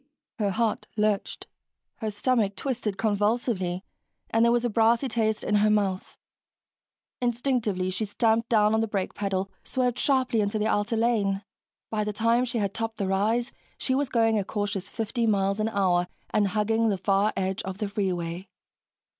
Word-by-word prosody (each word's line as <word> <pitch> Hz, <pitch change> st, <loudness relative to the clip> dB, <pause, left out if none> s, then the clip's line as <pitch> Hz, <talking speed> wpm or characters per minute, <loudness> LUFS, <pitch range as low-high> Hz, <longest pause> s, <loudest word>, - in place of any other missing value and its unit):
Her 205 Hz, -2 st, +1 dB
heart 220 Hz, +2 st, -1 dB
lurched, 210 Hz, -1 st, 0 dB, 0.5 s
her 220 Hz, -, -3 dB
stomach 210 Hz, -1 st, +1 dB
twisted 230 Hz, -7 st, -2 dB
convulsively, 205 Hz, -3 st, 0 dB, 0.5 s
and 225 Hz, +1 st, +3 dB
there 235 Hz, -, +5 dB
was 240 Hz, 0 st, +2 dB
a -, -, +1 dB
brassy 230 Hz, +4 st, +3 dB
taste 220 Hz, -2 st, 0 dB
in -, -, -1 dB
her 210 Hz, +1 st, +4 dB
mouth. 200 Hz, -3 st, 0 dB, 1.0 s
Instinctively, 235 Hz, -6 st, 0 dB
she 205 Hz, +4 st, -1 dB
stamped 225 Hz, +2 st, +1 dB
down 215 Hz, -2 st, +4 dB
on 220 Hz, -, +3 dB
the 225 Hz, -, 0 dB
brake 195 Hz, -3 st, -2 dB
pedal, 195 Hz, -1 st, -2 dB
swerved 250 Hz, -2 st, -1 dB
sharply 255 Hz, -5 st, +2 dB
into 205 Hz, +1 st, 0 dB
the 210 Hz, -, 0 dB
outer 220 Hz, +1 st, +1 dB
lane. 210 Hz, -4 st, +1 dB, 0.5 s
By 215 Hz, -1 st, 0 dB
the 210 Hz, 0 st, -3 dB
time 230 Hz, +4 st, +2 dB
she 240 Hz, -1 st, -3 dB
had 200 Hz, -3 st, -1 dB
topped 225 Hz, 0 st, -3 dB
the 200 Hz, -, -1 dB
rise, 220 Hz, +6 st, +1 dB, 0.3 s
she 260 Hz, -, -1 dB
was 275 Hz, 0 st, 0 dB
going 225 Hz, -3 st, +3 dB
a -, -, -1 dB
cautious 205 Hz, -1 st, -3 dB
50 230 Hz, +1 st, -1 dB
miles 200 Hz, -1 st, +1 dB
an 215 Hz, +1 st, +1 dB
hour 180 Hz, -4 st, +2 dB, 0.2 s
and 210 Hz, -1 st, +2 dB
hugging 220 Hz, +3 st, +1 dB
the 200 Hz, -, 0 dB
far 195 Hz, +2 st, +2 dB
edge 190 Hz, 0 st, -1 dB
of 190 Hz, 0 st, -6 dB
the 210 Hz, -1 st, -2 dB
freeway. 185 Hz, -3 st, -2 dB
215 Hz, 170 wpm, -26 LUFS, 195-230 Hz, 1.0 s, there